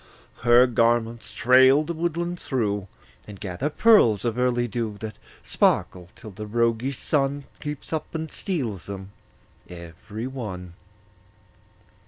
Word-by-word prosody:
Her 120 +1 +6
garments 115 -1 +1
trail 130 +4 +5
the 170 +2 -4
woodland 170 +1 -2
through, 105 -7 -2 0.4
And 100 -2 -10
gather 100 +10 -3
pearls 150 - +4
of 115 -2 0
early 125 -1 +1
dew 110 -2 -3
That 110 -1 -6 0.3
sparkle 90 -1 +1
till 110 -3 -11
the 105 +2 -8
roguish 115 +4 0
Sun 140 -1 0 0.2
Creeps 150 +1 -6
up 160 +1 -4
and 160 -1 -4
steals 115 - -3
them 95 -1 -7 0.6
every 90 +6 -8
one. 100 -10 -6
120 Hz, 125 wpm, -24 LUFS, 105-140 Hz, 0.6 s, Her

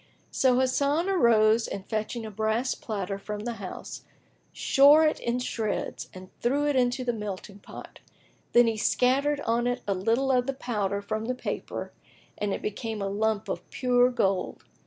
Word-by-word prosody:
So 255 -2 +3
Hasan 280 +7 +1
arose 230 - +4
and 195 - -6
fetching 220 +1 -3
a 215 - -7
brass 220 +5 0
platter 200 -3 -4
from 210 +1 -6
the 235 +1 -4
house, 185 - -7 0.5
shore 290 +3 +5
it 305 - +1
in 235 +1 -1
shreds 225 -4 -3
and 185 0 -12
threw 280 +5 +1
it 290 -1 +1
into 250 0 +1
the 240 -1 0
melting 205 -2 -6
pot; - - -11 0.5
then 240 0 +7
he 225 -1 0
scattered 275 +6 +2
on 235 0 0
it 245 0 -2
a 200 - +2
little 230 +8 +1
of 250 -1 +2
the 275 - -2
powder 205 -6 -2
from 215 +2 -3
the 255 +2 -2
paper - - -5 0.4
and 205 -1 -2
it - - -4
became 220 +1 -4
a 195 - -2
lump 215 +1 -1
of - - -5
pure 250 -1 +3
gold. 195 -7 -1
230 Hz, 175 wpm, -27 LUFS, 210-255 Hz, 0.5 s, then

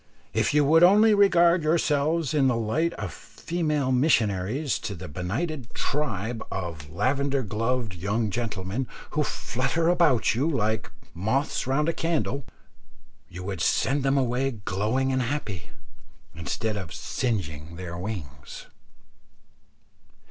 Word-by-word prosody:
If - - +2
you 150 0 +4
would 160 +3 +5
only 210 +5 +7
regard 175 -4 +5
yourselves 155 -1 +1
in 140 -3 +3
the 125 - +2
light 115 +10 0
of - - -5
female 150 -6 -2
missionaries 125 - +1
to 105 -3 -5
that 90 0 -8
benighted 120 - -3
tribe 115 -6 -2
of 85 -5 -5
lavender 135 - 0
gloved 115 +1 -1
young 100 +5 -1
gentlemen 110 +1 -3 0.2
who 150 - 0
flutter 150 +4 0
about 150 -12 +3
you 135 +8 +1
like 110 -7 0 0.2
moths 110 - -1
round 145 +4 +1
a 165 - +2
candle, 160 -5 -1 0.8
you 90 +1 -8
would 95 -4 -4
send 140 - +2
them 135 +1 +2
away 130 +1 +1 0.2
glowing 110 +7 0
and 130 0 +1
happy, 120 - -3 0.6
instead 105 +6 -3
of 95 -4 -6
singeing 85 - -3
their 85 0 -6
wings. 85 -8 -7
125 Hz, 125 wpm, -26 LUFS, 100-150 Hz, 0.8 s, only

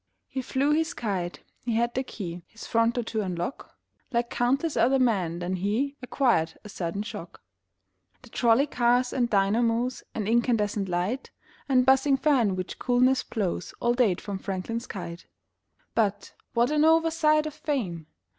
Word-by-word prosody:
He 265 - -4
flew 265 +3 0
his 320 +3 +1
kite; 185 -6 -3 0.2
he 235 -2 -1
had 235 +1 +1
the 260 - 0
key 180 -9 -6
His 225 - -11
front 230 +1 +2
door 245 - 0
to 220 -1 -2
unlock 180 +5 -4 0.4
Like 235 -1 0
countless 275 +6 +1
other 265 +3 +4
men, 195 -10 +1
then 180 +1 -2
he 225 +10 -1
Acquired 240 -11 +1
a 210 - -10
sudden 190 +1 -3
shock. 220 - -9 0.8
The - - -15
trolley 240 +3 +3
cars 245 -2 +2
and 240 -2 +1
dynamos 230 +5 +1
And 210 -3 -2
incandescent 220 -4 +1
light 180 +9 -2 0.4
And 255 -2 +4
buzzing 270 +1 +4
fan 260 -10 +2
which 185 0 -5
coolness 255 +1 +3
blows 195 -5 -3
All 240 - +2
date 225 -8 +2
from 200 -2 -5
Franklin's 200 +5 -4
kite. 175 -3 -7 0.7
But, 205 -3 0 0.2
what 240 +4 +3
an 300 0 +3
oversight 320 -1 +4
of 305 - -4
Fame! 250 - -3
235 Hz, 155 wpm, -27 LUFS, 195-265 Hz, 0.8 s, other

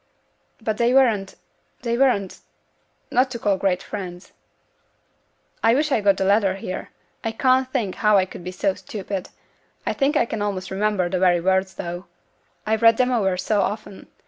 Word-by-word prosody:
'But 220 -2 -2
they 240 +2 +3
weren't 220 -8 +3 0.5
they 235 -1 0
weren't 235 -7 +1 0.7
not 255 +2 +3
to 245 - -5
call 205 -3 +1
great 185 -1 0
friends.' 180 -3 -7 1.3
'I 225 +1 +4
wish 300 +2 +1
I'd 220 -6 +1
got 200 -1 +5
the 190 - 0
letter 200 -1 +3
here; 185 -1 -6 0.3
I 225 - -1
can't 255 +2 +2
think 225 -9 -1
how 210 -1 +3
I 190 - +3
could 180 - -11
be 180 - -5
so 190 +1 0
stupid; 190 0 -6 0.6
I - - 0
think 290 +2 +1
I - - +3
can 225 -2 -4
almost 190 -2 -3
remember 200 -2 0
the 185 +1 -1
very 180 -1 +4
words, 190 +1 +1
though 175 +2 -6 0.6
I've 220 +1 0
read 230 -1 +6
them 255 0 +2
over 195 -6 +1
so 200 +3 +1
often. 205 -1 -4
205 Hz, 175 wpm, -23 LUFS, 190-235 Hz, 1.3 s, read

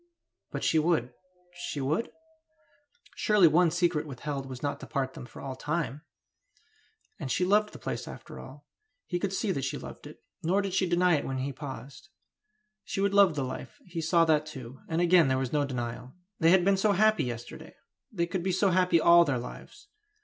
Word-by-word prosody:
But - - -5
she 160 - +3
would 155 -7 +1 0.4
she 175 -4 -5
would? 150 +11 -1 1.0
Surely 210 -5 +5
one 170 +2 +4
secret 170 -2 0
withheld 140 0 -5
was 130 0 -8
not 145 - -2
to - - -9
part 135 -2 -2
them 125 - -9
for - - -11
all 135 -1 -5
time! 150 -1 -3 1.2
And 135 -6 -4
she 180 - +1
loved 210 +2 +3
the - - -10
place - - -5
after - - -10
all, - - -12 0.4
he 175 - -2
could 190 +1 -2
see 195 +1 -1
that 140 -7 -2
she 135 - -2
loved - - -10
it, - - -14 0.2
nor 190 +5 +1
did 195 -2 -3
she 185 -1 +1
deny 175 -1 +3
it - - -3
when 135 - -3
he 135 +2 -3
paused; 135 +2 -9 0.7
she - - -4
would 200 0 +1
love 200 -5 +5
the 140 - -1
life, 130 - -7
he 170 -2 -5
saw 165 +1 +3
that 155 -1 +2
too, 130 -4 -9
and 165 +1 0
again 175 -3 +5
there 130 0 +1
was 130 0 -3
no 145 -1 +2
denial. 125 -1 -5 0.3
They 165 -2 +5
had 180 0 +5
been 195 0 +4
so 205 +1 +3
happy 215 -5 +3
yesterday! 120 -1 -7 0.4
They 170 -6 0
could 175 +1 -3
be 185 +2 -1
so 190 +1 +2
happy 180 -2 +3
all 170 +1 +7
their 140 -6 0
lives! 125 - -9
160 Hz, 200 wpm, -29 LUFS, 135-180 Hz, 1.2 s, all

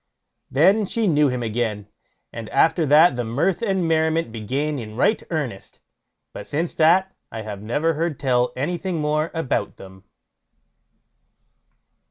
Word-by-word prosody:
Then 195 +9 +3
she 225 +2 -1
knew 150 -5 +3
him 125 -2 -2
again, 110 -2 -2 0.5
and 115 -2 -7
after 165 -1 +2
that 150 +1 +6
the 120 - -2
mirth 145 - -1
and 190 -6 0
merriment 160 -3 +1
began 135 +7 -3
in 110 -2 -8
right 210 - +2
earnest; 140 - -5 0.5
but - - -8
since 160 +4 -2
that 185 +4 +3 0.2
I 110 -1 -6
have 105 -2 -7
never 145 +10 0
heard 160 -1 -2
tell 125 -2 +1
anything 175 +5 -3
more 155 +1 0
about 165 -5 -2
them. 95 0 -14
150 Hz, 140 wpm, -22 LUFS, 120-165 Hz, 0.5 s, that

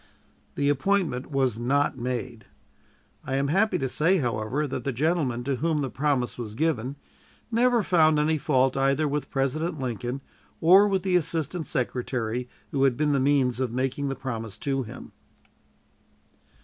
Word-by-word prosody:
The 140 - 0
appointment 145 -2 0
was 130 -5 0
not 140 +4 +1
made. 125 -3 -4 0.8
I 135 - -3
am 140 +1 0
happy 200 +7 +2
to 135 - -1
say, 165 +8 +2
however, 120 +1 -1
that 130 -3 -4
the 140 - -1
gentleman 135 -3 0
to 135 0 -1
whom 155 +1 0
the 135 -3 -3
promise 135 -4 -1
was 110 -3 -6
given 140 -3 -1 0.6
never 240 0 +3
found 160 -4 +4
any 155 +1 +1
fault 130 -3 +2
either 135 +3 +2
with 145 +1 -2
President 155 +4 -1
Lincoln 125 +1 -3 0.4
or 190 +5 +7
with 195 -2 0
the 185 -2 +1
Assistant 165 -1 -1
Secretary 125 -1 -2 0.2
who 135 -1 +1
had 125 -3 +2
been 150 -1 +1
the 140 - +2
means 130 -2 +2
of 130 -3 -1
making 135 +3 -1
the 135 - -2
promise 115 -5 -5
to 135 +1 -1
him. 115 - -9
135 Hz, 160 wpm, -26 LUFS, 125-155 Hz, 0.8 s, or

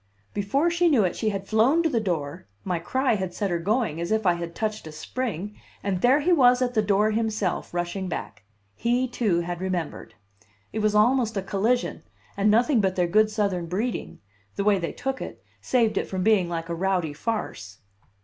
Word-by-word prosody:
Before 275 +12 +1
she 340 0 +3
knew 260 -9 +4
it 180 - 0
she 220 - 0
had 195 -2 -4
flown 250 +10 +3
to 325 - +2
the 240 - +1
door 160 - -3 0.2
my 180 -3 -1
cry 260 +9 0
had 190 -4 -3
set 200 -3 -1
her 170 - 0
going, 190 -3 0
as 170 - -3
if 220 -1 +1
I 175 - +5
had 170 -1 -6
touched 215 -5 -3
a - - -7
spring 210 +3 -4 0.3
and 190 -3 -1
there 260 +4 +4
he 355 +5 +3
was 250 -5 +5
at 250 -1 0
the 220 - +3
door 210 +1 +2
himself, 215 -4 -1
rushing 175 +2 -3
back. 105 - -6 0.3
He, 245 - 0
too, 210 -8 0
had 175 +1 -5
remembered. 180 -4 -4 0.6
It 220 - -2
was 210 0 +1
almost 230 0 +3
a 195 - -1
collision, 220 +6 0 0.3
and 200 +1 +2
nothing 235 +3 +4
but 190 -1 0
their 180 - +2
good 215 +5 +3
Southern 200 -5 -1
breeding, 210 +8 -3 0.4
the 200 - -1
way 200 -1 +3
they 170 - -3
took 270 0 -4
it, - - -8 0.2
saved 235 -4 +2
it - - -3
from 185 -1 -3
being 200 -5 +3
like 165 -1 -3
a 170 - -3
rowdy 180 -3 0
farce. 145 - -4
205 Hz, 205 wpm, -25 LUFS, 175-235 Hz, 0.6 s, I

